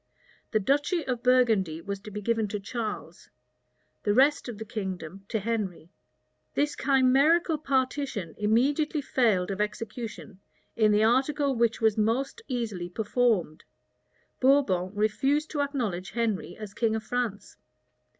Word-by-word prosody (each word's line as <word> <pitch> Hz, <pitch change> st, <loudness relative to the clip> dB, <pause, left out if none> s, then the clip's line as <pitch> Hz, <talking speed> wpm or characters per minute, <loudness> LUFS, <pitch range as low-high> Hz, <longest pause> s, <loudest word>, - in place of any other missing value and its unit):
The 215 Hz, -, +1 dB
duchy 290 Hz, -, +1 dB
of 250 Hz, -3 st, -2 dB
Burgundy 225 Hz, -10 st, +3 dB
was 200 Hz, +3 st, -5 dB
to 210 Hz, -, -10 dB
be 210 Hz, 0 st, -6 dB
given 225 Hz, 0 st, +1 dB
to 210 Hz, +1 st, -4 dB
Charles; 210 Hz, -5 st, -6 dB, 0.7 s
the 205 Hz, -1 st, +1 dB
rest 275 Hz, +1 st, +3 dB
of 230 Hz, -, -6 dB
the 220 Hz, -, -6 dB
kingdom 195 Hz, -4 st, -6 dB
to 225 Hz, -, -1 dB
Henry. 200 Hz, -6 st, -3 dB, 0.6 s
This 295 Hz, +1 st, +1 dB
chimerical 280 Hz, +5 st, +3 dB
partition 260 Hz, -, -1 dB
immediately 275 Hz, +9 st, +2 dB
failed 215 Hz, -9 st, +1 dB
of 195 Hz, +1 st, -2 dB
execution 215 Hz, -1 st, -5 dB, 0.4 s
in 215 Hz, -2 st, +4 dB
the 210 Hz, +1 st, +4 dB
article 275 Hz, +4 st, +2 dB
which 235 Hz, -1 st, +1 dB
was 220 Hz, -1 st, +3 dB
most 255 Hz, -, 0 dB
easily 220 Hz, -9 st, -3 dB
performed: 210 Hz, -5 st, 0 dB, 0.8 s
Bourbon 255 Hz, -10 st, +3 dB
refused 265 Hz, +9 st, +1 dB
to 290 Hz, -, -1 dB
acknowledge 230 Hz, -11 st, -2 dB
Henry 220 Hz, -6 st, -2 dB
as 210 Hz, -2 st, -8 dB
king 225 Hz, 0 st, 0 dB
of 220 Hz, -, -3 dB
France. 230 Hz, -3 st, -3 dB
225 Hz, 135 wpm, -27 LUFS, 205-265 Hz, 0.8 s, in